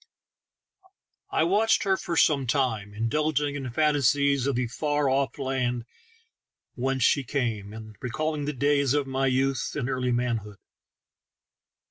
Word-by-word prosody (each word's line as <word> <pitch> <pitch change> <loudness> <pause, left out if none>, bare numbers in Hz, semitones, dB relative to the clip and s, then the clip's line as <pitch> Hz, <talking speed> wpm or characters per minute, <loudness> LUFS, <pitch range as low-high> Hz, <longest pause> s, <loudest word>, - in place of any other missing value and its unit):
I - - +1
watched 210 +6 +3
her 195 -2 +2
for 170 -3 -4
some 140 -6 +3
time, 115 -6 0
indulging 145 +7 0
in 135 -3 -4
fancies 140 -1 +2
of 140 - 0
the 125 +1 0
far 145 +4 -1
off 135 -1 0
land 130 -3 -2 0.9
whence 130 0 -1
she 140 - +3
came, 115 -5 -2
and 110 0 -10
recalling 150 +4 -2
the 150 - -2
days 140 0 +2
of 145 -1 +1
my 135 0 0
youth 135 +1 0
and 140 -5 -2
early 130 -2 -1
manhood. 115 -4 -2
135 Hz, 135 wpm, -26 LUFS, 120-145 Hz, 0.9 s, watched